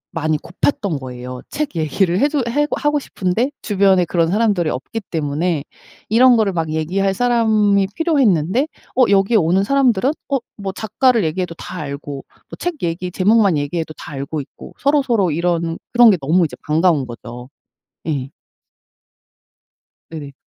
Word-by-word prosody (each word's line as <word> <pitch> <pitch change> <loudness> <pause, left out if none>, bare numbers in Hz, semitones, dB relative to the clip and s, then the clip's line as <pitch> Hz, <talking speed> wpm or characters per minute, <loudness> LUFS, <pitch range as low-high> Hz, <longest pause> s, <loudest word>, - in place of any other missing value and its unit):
많이 155 -1 0
고팠던 180 - -1
거예요. 125 -1 -8
책 295 -7 -3
얘기를 170 +3 +1
해 285 - +3
주 290 -3 0
해고 295 +5 0
하고 295 0 +1
싶은데 220 0 -1
주변에 195 -3 +3
그런 170 -1 +1
사람들이 200 -4 +1
없기 150 - -4
때문에 155 0 -1 0.5
이런 245 +3 +6
거를 210 -3 +1
막 165 -2 -2
얘기할 185 +5 0
사람이 215 -4 +2
필요했는데 260 - +2 0.3
어 255 - +5
여기에 200 +3 +4
오는 185 +1 +2
사람들은 260 0 +2 0.2
어 275 - +2 0.2
뭐 200 -2 -4
작가를 220 +1 +1
얘기해도 170 +2 -2
다 - - -8
알고 140 -1 -6 0.3
또 - - -8
책 350 -4 -4
얘기 175 +2 -2
제목만 200 -1 +3
얘기해도 155 +2 -3
다 - - -9
알고 140 +3 -4
있고 135 - -13
서로서로 255 - +2
이런 170 +1 -1 0.2
그런 240 -1 +7
게 - - +3
너무 165 +6 +3
이제 155 - -6
반가운 155 -2 +2
거죠. 120 +1 -9 0.6
예. 135 -4 -2 1.8
네네. 150 -4 -8
185 Hz, 325 characters per minute, -19 LUFS, 155-230 Hz, 1.8 s, 그런